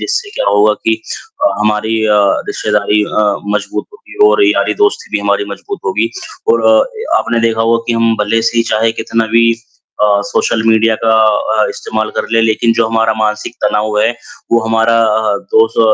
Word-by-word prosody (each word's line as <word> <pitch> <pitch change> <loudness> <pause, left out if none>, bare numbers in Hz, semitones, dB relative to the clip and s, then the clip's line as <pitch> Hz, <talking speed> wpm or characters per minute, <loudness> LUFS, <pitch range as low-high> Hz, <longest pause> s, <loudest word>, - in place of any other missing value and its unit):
जिससे 400 +1 -3
क्या - - -1
होगा 105 +1 +3
कि 110 - +2 0.5
अ, 100 - +1
हमारी 105 +1 0
अ, 105 -1 +3 0.3
रिश्तेदारी 105 0 0
अ, 105 - -1 0.3
मज़बूत 320 - -5
होगी 420 -1 -2
और 410 - +3
यारी-दोस्ती 415 +6 0
भी - - -3
हमारी 410 - 0
मज़बूत 400 -1 -7
होगी। - - -1 0.4
और - - 0
अ, - - +5 0.2
ए - - -5
आपने 115 -1 -1
देखा 115 0 -2
होगा 115 +1 +1
कि - - +2
हम 115 0 +2
भले 115 +2 0
से 115 +1 -1
ही - - +4
चाहे 110 +1 +1
कितना 115 0 -2
भी 115 0 +4 0.5
अ, - - +5 0.2
सोशल 110 +2 0
मीडिया 110 0 +3
का 115 - +3 0.5
अ, - - +2
इस्तेमाल 110 0 -4
कर - - -1
ले 115 - +3
लेकिन 115 +1 +1
जो 115 - +3
हमारा 115 0 +1
मानसिक 105 0 -2
तनाव 105 0 0
है, 110 +2 +2 0.4
वो 115 - +4
हमारा 115 +1 +2
अ, 110 -1 +1 0.2
दोस्त 110 +1 +3
115 Hz, 185 wpm, -13 LUFS, 110-115 Hz, 0.5 s, अ